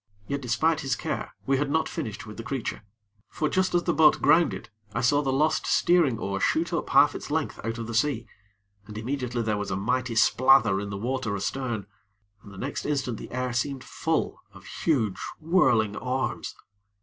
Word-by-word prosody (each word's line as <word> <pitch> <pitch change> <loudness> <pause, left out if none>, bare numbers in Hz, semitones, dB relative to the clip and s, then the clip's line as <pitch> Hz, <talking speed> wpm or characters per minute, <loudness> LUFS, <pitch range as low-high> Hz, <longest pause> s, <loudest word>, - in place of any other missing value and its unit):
Yet, 140 0 -2
despite 155 +6 +1
his 135 -4 0
care, - - -4
we 135 0 +2
had 145 +1 -1
not 160 +2 +1
finished 115 -9 -5
with 105 -1 -9
the - - -4
creature; 130 0 -4 0.5
for, 155 - -1
just 185 +3 +1
as 175 - +3
the 170 - +1
boat 160 -1 +5
grounded, 160 -8 +2 0.2
I - - 0
saw 145 +3 +3
the 135 -2 -1
lost 155 +4 +1
steering 170 -9 +3
oar 100 -2 -3
shoot - - +1
up - - -2
half - - +5
its - - -7
length - - -2
out 115 +1 -3
of 115 - -4
the 115 - -6
sea, 115 -1 +1 0.6
and 105 -1 -8
immediately 125 0 -2
there 110 -2 0
was 105 - -3
a 95 - -1
mighty 125 +4 -1
splather 115 -3 +5
in 100 - -5
the 100 - -4
water 120 -1 -2
astern, 115 +1 -3 0.6
and 100 - -13
the 100 - -12
next 135 +8 -4
instant 135 -6 -1
the - - -8
air 125 -1 -2
seemed 130 +2 -2
full - - -2
of - - -14
huge, 115 - 0 0.2
whirling 120 - +3
arms. 130 +2 -3
125 Hz, 195 wpm, -26 LUFS, 110-145 Hz, 0.6 s, boat